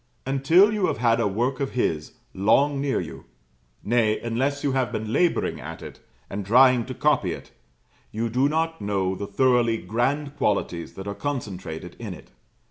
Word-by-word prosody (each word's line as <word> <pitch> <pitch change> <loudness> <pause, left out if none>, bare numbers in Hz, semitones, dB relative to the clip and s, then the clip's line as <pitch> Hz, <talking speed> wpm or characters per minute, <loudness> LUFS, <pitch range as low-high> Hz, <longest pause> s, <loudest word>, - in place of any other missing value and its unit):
Until 160 +10 +4
you 205 -4 +1
have - - -1
had 115 0 +2
a 115 - +2
work 120 +7 -1
of 140 -1 -2
his 80 -11 -1 0.2
long 135 +9 +2
near 140 -1 0
you; - - -7 0.6
nay, 110 -1 +2
unless 135 +5 -1
you 140 - +1
have 130 -4 0
been 110 +1 -3
labouring 175 -1 +1
at - - -8
it, - - -10 0.3
and 100 +4 -5
trying 125 +3 +5
to 130 - -6
copy 120 - +2
it, - - -11 0.6
you 115 +2 -2
do 130 +5 +2
not 165 +1 -1
know 95 -2 0
the 100 +2 -5
thoroughly 120 +1 +2
grand 135 +9 -1
qualities 100 - -1
that 95 - -7
are 100 - -3
concentrated 95 - -5
in 105 -6 -6
it. - - -16
120 Hz, 175 wpm, -24 LUFS, 100-140 Hz, 0.6 s, trying